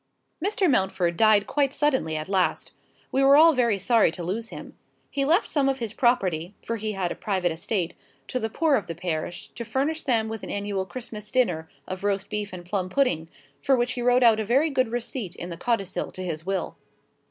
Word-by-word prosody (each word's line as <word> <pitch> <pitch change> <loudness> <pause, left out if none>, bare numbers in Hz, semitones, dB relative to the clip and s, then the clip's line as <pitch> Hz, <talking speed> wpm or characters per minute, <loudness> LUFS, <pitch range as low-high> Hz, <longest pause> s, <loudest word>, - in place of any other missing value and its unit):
Mr. 400 -1 +2
Mountford 190 - +1
died 215 0 +5
quite 280 -2 +1
suddenly 265 - +1
at 155 - -4
last. 190 -2 0 0.4
We 270 - +2
were 275 +1 +7
all 325 +1 +7
very 235 -6 +2
sorry 225 +2 +4
to 175 - -6
lose 220 +7 -3
him. - - -10 0.4
He 275 -1 0
left 335 +8 +3
some 275 -3 +2
of 270 - 0
his 230 -4 -4
property 190 -8 +1
(for 230 - -2
he 215 0 -3
had 185 -3 -2
a - - -3
private 185 -4 -1
estate) 170 +2 -2 0.4
to 255 - -1
the 220 -2 -2
poor 310 +6 +1
of 205 -9 +1
the 165 - -5
parish, 170 0 -4
to 235 - -7
furnish 275 +8 -1
them 230 -6 +1
with 220 -1 -5
an - - -7
annual 200 -2 -2
Christmas 215 -4 -7
dinner 175 -11 0 0.2
of 185 +1 -6
roast 200 0 -1
beef 210 -1 -3
and 180 -1 -8
plum 185 0 -2
pudding, 185 - +1 0.3
for 275 - +3
which 245 0 0
he 250 - -3
wrote 245 +1 +4
out 225 -2 +6
a - - 0
very 270 +9 +2
good 260 -3 +2
receipt 235 -4 -4
in 175 - -6
the - - -4
codicil 195 0 -1
to 185 - -6
his 165 -1 -5
will. 195 -1 -2
215 Hz, 215 wpm, -25 LUFS, 185-255 Hz, 0.4 s, were